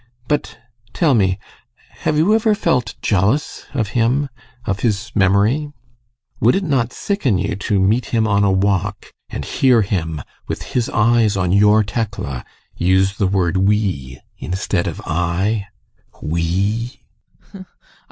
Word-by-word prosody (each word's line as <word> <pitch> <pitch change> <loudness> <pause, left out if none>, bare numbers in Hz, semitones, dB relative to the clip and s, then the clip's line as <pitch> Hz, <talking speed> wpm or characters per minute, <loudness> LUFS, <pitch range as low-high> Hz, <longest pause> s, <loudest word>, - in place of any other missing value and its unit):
But 150 -1 -1 0.4
tell 160 -5 +3
me: 95 -5 +2 0.6
have 150 - 0
you 170 +8 +4
ever 220 -1 +3
felt 125 - 0
jealous 105 +9 0
of 110 -6 0
him 125 +5 +1 0.4
of 100 0 -1
his 110 0 -1
memory? 105 +9 +2 0.7
Would 120 - +4
it 195 - 0
not 130 -8 0
sicken 150 - 0
you 100 +3 -1
to 100 0 0
meet 105 +6 +2
him 110 -2 +1
on 100 -1 +2
a 100 - +3
walk 100 +1 -1 0.2
and - - -5
hear 125 -5 +3
him, 80 -7 -2 0.2
with - - -4
his 120 -2 0
eyes 110 -2 +3
on 90 -2 0
your 105 +2 +5
Tekla, 100 - -4 0.3
use 95 +2 +2
the 100 - +2
word 95 -2 +1
"we" 95 -11 0 0.2
instead 95 0 -2
of - - -4
"I"? 95 +6 -1 0.5
We! 95 - -2
105 Hz, 135 wpm, -19 LUFS, 95-120 Hz, 0.7 s, your